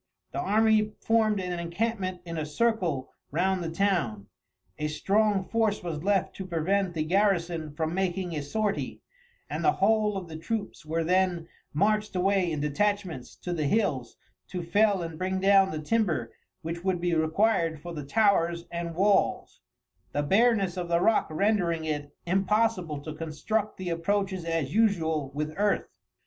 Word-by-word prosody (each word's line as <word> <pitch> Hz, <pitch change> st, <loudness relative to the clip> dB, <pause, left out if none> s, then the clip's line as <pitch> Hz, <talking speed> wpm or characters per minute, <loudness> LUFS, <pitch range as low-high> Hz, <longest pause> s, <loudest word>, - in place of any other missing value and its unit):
The -, -, -3 dB
army 215 Hz, -, +3 dB
formed 220 Hz, -2 st, +2 dB
an 180 Hz, -2 st, -3 dB
encampment 185 Hz, +1 st, -2 dB
in 165 Hz, -1 st, -5 dB
a 155 Hz, -, -2 dB
circle 165 Hz, -, 0 dB, 0.2 s
round 185 Hz, +4 st, 0 dB
the 165 Hz, -, -3 dB
town. 165 Hz, -, 0 dB, 0.5 s
A 150 Hz, -, 0 dB
strong 200 Hz, +5 st, +1 dB
force 220 Hz, -4 st, 0 dB
was 160 Hz, -4 st, -4 dB
left 195 Hz, -1 st, +1 dB
to 190 Hz, -, -6 dB
prevent 180 Hz, +2 st, 0 dB
the 155 Hz, -, 0 dB
garrison 170 Hz, -3 st, +1 dB
from 160 Hz, +1 st, -1 dB
making 185 Hz, -1 st, -1 dB
a 150 Hz, -, -2 dB
sortie, 205 Hz, +8 st, -2 dB, 0.4 s
and -, -, -4 dB
the 370 Hz, -, +4 dB
whole 210 Hz, 0 st, +2 dB
of 185 Hz, -2 st, -6 dB
the 160 Hz, -1 st, -7 dB
troops 210 Hz, +2 st, -4 dB
were 165 Hz, +1 st, 0 dB
then 180 Hz, -1 st, +1 dB, 0.2 s
marched 210 Hz, +5 st, +1 dB
away 185 Hz, -1 st, +2 dB
in 150 Hz, -2 st, -2 dB
detachments 170 Hz, -2 st, -1 dB
to 180 Hz, -, -2 dB
the 155 Hz, -4 st, 0 dB
hills 140 Hz, -, 0 dB, 0.3 s
to 180 Hz, -2 st, -4 dB
fell 200 Hz, +1 st, +2 dB
and 165 Hz, -1 st, -7 dB
bring 190 Hz, +1 st, -1 dB
down 195 Hz, 0 st, +5 dB
the 155 Hz, -, -4 dB
timber 155 Hz, -, 0 dB, 0.3 s
which 170 Hz, +2 st, -5 dB
would 185 Hz, -2 st, 0 dB
be 175 Hz, 0 st, 0 dB
required 165 Hz, 0 st, +2 dB
for 175 Hz, +3 st, -8 dB
the 150 Hz, -3 st, -5 dB
towers 170 Hz, -1 st, +2 dB
and 170 Hz, -1 st, -4 dB
walls, 195 Hz, +2 st, +1 dB, 0.5 s
the 145 Hz, -, 0 dB
bareness 195 Hz, +1 st, +3 dB
of 175 Hz, -1 st, -3 dB
the 170 Hz, 0 st, +3 dB
rock 220 Hz, +4 st, +3 dB
rendering 170 Hz, -2 st, +1 dB
it 145 Hz, -2 st, -3 dB
impossible 190 Hz, -3 st, +1 dB
to 155 Hz, -, -6 dB
construct 165 Hz, +8 st, -2 dB
the 185 Hz, -1 st, -4 dB
approaches 190 Hz, +1 st, -1 dB
as 165 Hz, -4 st, -1 dB
usual 160 Hz, -10 st, +2 dB
with 150 Hz, +1 st, -2 dB
earth. 205 Hz, 0 st, +1 dB
180 Hz, 160 wpm, -28 LUFS, 160-205 Hz, 0.5 s, down